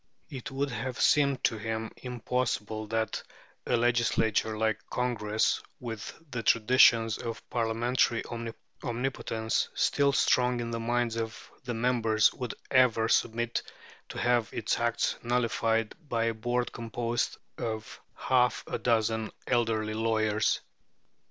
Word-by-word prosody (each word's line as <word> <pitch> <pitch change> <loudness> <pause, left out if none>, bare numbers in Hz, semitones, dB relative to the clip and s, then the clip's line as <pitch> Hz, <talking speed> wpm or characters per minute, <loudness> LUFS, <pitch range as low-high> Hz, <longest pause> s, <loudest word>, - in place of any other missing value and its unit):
It 130 -4 -6
would 135 +1 -2
have 125 0 -4
seemed 140 -2 +3
to 110 - +1
him 110 +1 -3
impossible 120 -3 -2
that 110 0 -1 0.5
a 120 - +3
legislature 115 -2 +2
like 110 -1 +1
Congress, 110 -4 0 0.2
with 115 -4 -6 0.2
the 120 - -2
traditions 115 -1 +5
of 115 -1 -6
parliamentary 115 +1 +1 0.6
omnipotence 120 -3 -1
still 140 -1 +3
strong 125 -2 +3
in 115 0 -3
the 115 - -2
minds 120 0 0
of 115 -1 -5
the 120 -2 -3
members, 115 -2 +3
would 125 -3 -5 0.2
ever 125 -4 +4
submit 120 +1 +1 0.5
to - - -7
have 120 -2 +2
its 110 - -1
acts 120 0 0
nullified 115 -2 +1 0.2
by 115 -1 +1
a 115 0 +1
board 120 +2 -1
composed 115 +1 -2 0.2
of 110 -1 -5
half 125 -1 +2
a - - -3
dozen 110 -2 +1 0.2
elderly 115 -3 +1
lawyers. 110 -1 +1
115 Hz, 125 wpm, -29 LUFS, 110-125 Hz, 0.6 s, traditions